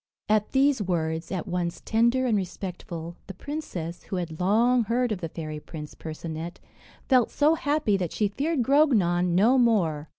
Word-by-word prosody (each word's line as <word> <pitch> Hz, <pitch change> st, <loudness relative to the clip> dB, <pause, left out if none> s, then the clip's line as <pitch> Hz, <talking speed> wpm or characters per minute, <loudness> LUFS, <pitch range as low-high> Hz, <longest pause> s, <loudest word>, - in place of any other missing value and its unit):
At 210 Hz, 0 st, +1 dB
these 275 Hz, -2 st, +3 dB
words, 165 Hz, -3 st, -2 dB
at 185 Hz, -3 st, -2 dB
once 175 Hz, -2 st, -2 dB
tender 235 Hz, +3 st, +2 dB
and 235 Hz, -4 st, +2 dB
respectful, 175 Hz, -3 st, -5 dB
the 195 Hz, -, -8 dB
princess, 180 Hz, -, -5 dB
who -, -, -4 dB
had 170 Hz, -3 st, -4 dB
long 230 Hz, +6 st, +3 dB
heard 240 Hz, +2 st, 0 dB
of 200 Hz, -, -3 dB
the 165 Hz, -, -3 dB
fairy 155 Hz, -2 st, -6 dB
prince 150 Hz, -1 st, -9 dB
Percinet, 160 Hz, +2 st, -6 dB, 0.5 s
felt 255 Hz, -4 st, +4 dB
so 300 Hz, +2 st, +3 dB
happy 290 Hz, -9 st, +1 dB
that 180 Hz, -4 st, -3 dB
she 210 Hz, -, +1 dB
feared 275 Hz, +6 st, -1 dB
Grognon 200 Hz, -, +3 dB
no 235 Hz, +8 st, +5 dB
more. 170 Hz, -11 st, +2 dB
195 Hz, 165 wpm, -26 LUFS, 170-245 Hz, 0.5 s, no